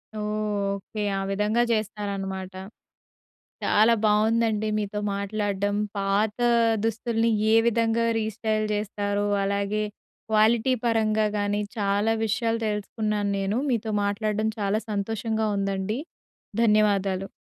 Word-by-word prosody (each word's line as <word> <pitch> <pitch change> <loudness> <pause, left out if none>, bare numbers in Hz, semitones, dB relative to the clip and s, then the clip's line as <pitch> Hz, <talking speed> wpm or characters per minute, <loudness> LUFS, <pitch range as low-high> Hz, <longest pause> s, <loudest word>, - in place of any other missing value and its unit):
ఓహ్! 215 - -3 0.5
Okay. 210 +2 -6 0.2
ఆ - - -2
విధంగా 210 +4 +1
జేస్తారన్నమాట. 200 -3 -3 1.1
చాలా 220 +3 +5
బావుందండి 220 0 +2
మీతో 210 0 -3 0.2
మాట్లాడ్డం. 205 0 -1 0.2
పాత 205 +2 0 0.5
దుస్తుల్ని 225 +1 0 0.2
ఏ - - +6
విధంగా 230 0 +2
రీస్టైల్ 215 0 -1
జేస్తారు 205 -1 -1 0.2
అలాగే 200 +1 0 0.5
క్వాలిటీ 220 +3 +4
పరంగా 220 -2 +2
గానీ 205 0 0 0.2
చాలా 205 +1 +1
విషయాలు 230 +1 0
తెలుసుకున్నాను 210 0 -2
నేను. 195 +2 -1
మీతో 225 -2 -1
మాట్లాడడం 210 +1 0
చాలా 205 +2 +1
సంతోషంగా 220 +1 -1
ఉందండి. 195 +3 -1 0.6
ధన్యవాదాలు. 200 -3 +2
210 Hz, 100 wpm, -25 LUFS, 200-220 Hz, 1.1 s, ఏ